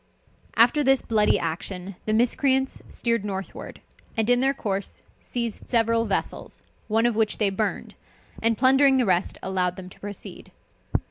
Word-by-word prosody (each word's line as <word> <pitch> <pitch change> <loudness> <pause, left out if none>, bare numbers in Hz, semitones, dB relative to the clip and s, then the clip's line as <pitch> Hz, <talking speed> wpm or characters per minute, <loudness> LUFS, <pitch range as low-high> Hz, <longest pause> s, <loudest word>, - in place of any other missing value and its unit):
_] - - -40 0.5
After 240 +6 +4
this 270 -1 +4
bloody 215 -2 +3
action, 180 +3 -4
the 215 - 0
miscreants 265 +3 +1
steered 230 -3 -1
northward, 195 -2 -6 0.4
and 225 +2 +2
in 245 - +5
their 270 +2 +3
course 200 -7 -4 0.2
seized 235 -3 -3
several 230 -1 +2
vessels, 200 - -4 0.2
one 225 +2 +2
of 240 -2 +1
which 220 -1 +1
they 205 -3 +2
burned, 200 +1 -3 0.5
and 230 -1 +2
plundering 270 +1 +5
the 250 - +2
rest, 180 -2 +1
allowed 185 -2 -1
them 185 -1 -9
to - - -17
proceed. 205 0 -8
225 Hz, 155 wpm, -24 LUFS, 195-245 Hz, 0.5 s, in